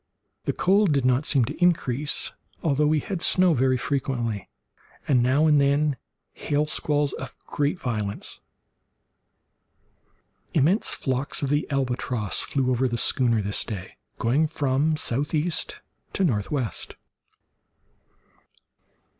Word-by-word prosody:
The -, -, 0 dB
cold 195 Hz, -2 st, +3 dB
did 135 Hz, -3 st, +1 dB
not 130 Hz, +3 st, +2 dB
seem 135 Hz, -6 st, +3 dB
to 150 Hz, +8 st, -4 dB
increase, 150 Hz, -5 st, +1 dB, 0.3 s
although 150 Hz, -1 st, +2 dB
we 155 Hz, 0 st, +2 dB
had 185 Hz, +1 st, -4 dB
snow 185 Hz, -2 st, +4 dB
very 130 Hz, -1 st, +2 dB
frequently, 120 Hz, -5 st, -2 dB, 0.6 s
and 130 Hz, -4 st, +4 dB
now 130 Hz, +5 st, +3 dB
and 150 Hz, -2 st, +5 dB
then 140 Hz, +1 st, +2 dB, 0.4 s
hail 145 Hz, +1 st, -1 dB
squalls 150 Hz, -2 st, 0 dB
of 130 Hz, -1 st, -7 dB
great 145 Hz, +5 st, -1 dB
violence. 105 Hz, -4 st, -3 dB, 2.1 s
Immense 165 Hz, -, +3 dB
flocks 135 Hz, +2 st, -1 dB
of 140 Hz, -, 0 dB
the 145 Hz, +1 st, 0 dB
albatross 125 Hz, -6 st, -1 dB
flew 130 Hz, -2 st, -1 dB
over 130 Hz, +1 st, +1 dB
the 120 Hz, -1 st, -2 dB
schooner 115 Hz, -3 st, +2 dB
this 100 Hz, +1 st, -1 dB
day, 95 Hz, -5 st, -7 dB, 0.2 s
going 135 Hz, +8 st, +2 dB
from 150 Hz, +1 st, 0 dB
southeast 150 Hz, +5 st, 0 dB, 0.3 s
to 195 Hz, -, 0 dB
northwest. 120 Hz, -, -2 dB
140 Hz, 120 wpm, -25 LUFS, 125-150 Hz, 2.1 s, and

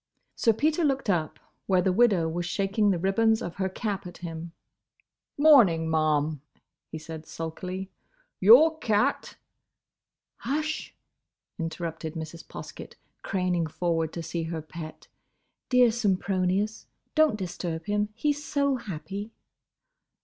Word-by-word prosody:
Sir 230 Hz, -, +3 dB
Peter 310 Hz, -, +1 dB
looked 275 Hz, -7 st, +1 dB
up, 160 Hz, -4 st, -1 dB, 0.3 s
where 185 Hz, -2 st, +3 dB
the 185 Hz, -, +2 dB
widow 195 Hz, -6 st, +4 dB
was 175 Hz, +2 st, -3 dB
shaking 200 Hz, +3 st, +1 dB
the 190 Hz, -, +2 dB
ribbons 220 Hz, +5 st, +2 dB
of 175 Hz, -, -6 dB
her 190 Hz, -1 st, 0 dB
cap 200 Hz, -1 st, -4 dB
at 175 Hz, -, -10 dB
him. 165 Hz, -1 st, -7 dB, 0.9 s
"Morning, 235 Hz, -, +6 dB
ma'am," 155 Hz, -2 st, +1 dB, 0.5 s
he 160 Hz, -, -5 dB
said, 160 Hz, 0 st, -9 dB
sulkily. 185 Hz, +4 st, -6 dB, 0.5 s
"Your 300 Hz, -, +7 dB
cat—" 225 Hz, +4 st, 0 dB, 1.0 s
"Hush!" 305 Hz, +5 st, -3 dB, 0.6 s
interrupted 165 Hz, -1 st, -4 dB
Mrs. 160 Hz, +1 st, -7 dB
Poskett, -, -, -9 dB, 0.3 s
craning 180 Hz, -3 st, 0 dB
forward 165 Hz, -1 st, -1 dB
to 170 Hz, -, -5 dB
see 170 Hz, +1 st, -3 dB
her 160 Hz, -1 st, -4 dB
pet. 155 Hz, 0 st, -9 dB, 0.6 s
"Dear 250 Hz, -2 st, +5 dB
Sempronius!—Don't 205 Hz, -, 0 dB
disturb 175 Hz, -4 st, -4 dB
him! 210 Hz, 0 st, 0 dB
He's 290 Hz, +4 st, -1 dB
so 280 Hz, -3 st, +1 dB
happy!" 200 Hz, 0 st, -6 dB
190 Hz, 120 wpm, -27 LUFS, 165-225 Hz, 1.0 s, Your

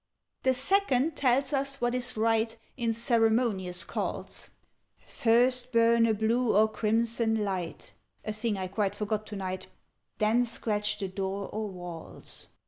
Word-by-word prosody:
"The 260 Hz, 0 st, +2 dB
Second 285 Hz, -1 st, +2 dB
tells 270 Hz, +2 st, +2 dB
us 275 Hz, 0 st, 0 dB
what 240 Hz, 0 st, 0 dB
is 250 Hz, -2 st, +1 dB
right 225 Hz, +1 st, +1 dB, 0.2 s
In 235 Hz, -3 st, 0 dB
ceremonious 225 Hz, -5 st, +2 dB
calls: -, -, -4 dB, 0.6 s
'First 245 Hz, +2 st, +2 dB
burn 230 Hz, 0 st, +4 dB
a 220 Hz, -, +3 dB
blue 225 Hz, +2 st, +1 dB
or 215 Hz, +1 st, +6 dB
crimson 225 Hz, 0 st, 0 dB
light' 185 Hz, -4 st, -4 dB, 0.3 s
(A 215 Hz, -, -2 dB
thing 215 Hz, -1 st, -1 dB
I 190 Hz, -, -2 dB
quite 195 Hz, +1 st, -1 dB
forgot 215 Hz, +1 st, -2 dB
to 210 Hz, -, -6 dB
night), 185 Hz, -1 st, -4 dB, 0.5 s
'_Then 220 Hz, +3 st, +3 dB
scratch 210 Hz, -3 st, -1 dB
the 195 Hz, -, -3 dB
door 195 Hz, +1 st, -3 dB
or 215 Hz, -1 st, -3 dB
walls. 175 Hz, -3 st, -7 dB
225 Hz, 140 wpm, -29 LUFS, 205-245 Hz, 0.6 s, or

